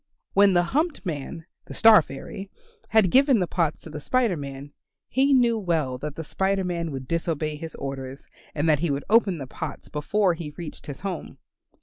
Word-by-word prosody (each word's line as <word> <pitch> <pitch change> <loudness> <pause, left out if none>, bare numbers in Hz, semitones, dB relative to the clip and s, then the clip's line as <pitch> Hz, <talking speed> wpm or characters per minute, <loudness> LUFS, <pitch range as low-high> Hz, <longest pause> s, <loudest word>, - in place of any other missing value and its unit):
When 200 0 +5
the 175 0 +4
humped 300 - -1
man, 160 0 -5 0.2
the - - -9
Star 225 -4 +8
fairy, 190 +7 -8 0.4
had 215 -5 +4
given 270 -1 +5
the 180 - +1
pots 165 -3 -1
to 160 - -10
the 150 0 -6
Spider 240 - +1
Man, 140 -1 -7 0.4
he 270 +3 +2
knew 240 -4 +4
well 155 -9 -1
that 150 +1 -5
the 165 - -5
Spider 190 +4 0
Man 170 -2 -2
would 135 -3 -6
disobey 160 -2 -1
his 160 +1 -8
orders 135 0 -6 0.3
and 150 +2 0
that 150 -3 +4
he 170 +1 0
would 140 0 -2
open 215 -6 +4
the 140 - -6
pots 145 +3 -7
before 185 +6 +1
he 160 -3 -7
reached 170 -3 -8
his 140 -2 -7
home. 190 -3 -5
165 Hz, 195 wpm, -25 LUFS, 145-195 Hz, 0.4 s, Star